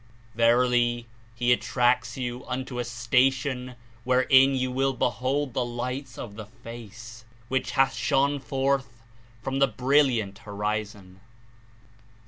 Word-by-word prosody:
Verily, 120 +1 +2 0.3
He 120 +1 +3
attracts 120 -1 +1
you 125 -1 -4
unto 130 -1 -4
a - - 0
station 125 +2 0 0.3
wherein 130 +2 +5
you 130 -1 -1
will 135 +1 +1
behold 130 +3 -1
the - - 0
Lights 125 +2 -5
of 105 -3 -8
the 110 -2 -8
Face, 115 -1 -11 0.3
which 130 0 -1
hath 135 - +3
shone 140 +1 +1
forth 135 -3 -2 0.4
from 135 0 -2
this 135 0 +4
brilliant 125 -4 +1
Horizon." 105 -2 -4
125 Hz, 115 wpm, -26 LUFS, 115-130 Hz, 0.4 s, wherein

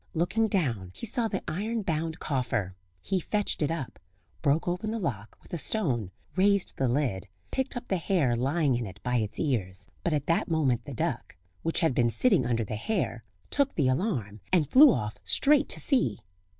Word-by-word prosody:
Looking 220 +7 +1
down 125 - -1
he - - -6
saw 235 0 +1
the 195 -3 -3
iron 210 +7 -2
bound 160 -1 -2
coffer; 115 - -2 0.3
he 190 -1 0
fetched 205 +2 -1
it 150 - +2
up, 160 -6 -4 0.4
broke 150 +3 +1
open 180 +5 -1
the 225 - -2
lock 115 - -4
with - - -17
a 170 - -2
stone, 125 - -1 0.3
raised 200 0 +2
the 135 - +1
lid, 120 -7 -1 0.2
picked 265 -1 -2
up 245 - -7
the 190 - +1
hare 160 -8 +1
lying 140 +4 +1
in 120 -2 -2
it 100 +2 -11
by 125 0 +1
its 110 -2 -2
ears; 100 - -1
but 170 - 0
at 145 -2 0
that 165 - +1
moment 145 -8 +1
the - - -7
duck, - - -3 0.3
which 165 - 0
had 160 -5 +3
been 120 -1 +3
sitting 180 - +3
under 115 -2 +1
the 110 0 -4
hare, 125 - -2 0.3
took 280 -1 +1
the 135 -5 +2
alarm, 125 - -1
and 155 -6 +2
flew 280 +1 +9
off 105 - -3
straight 285 0 +3
to - - +1
sea. 250 - +2
155 Hz, 195 wpm, -28 LUFS, 120-195 Hz, 0.4 s, flew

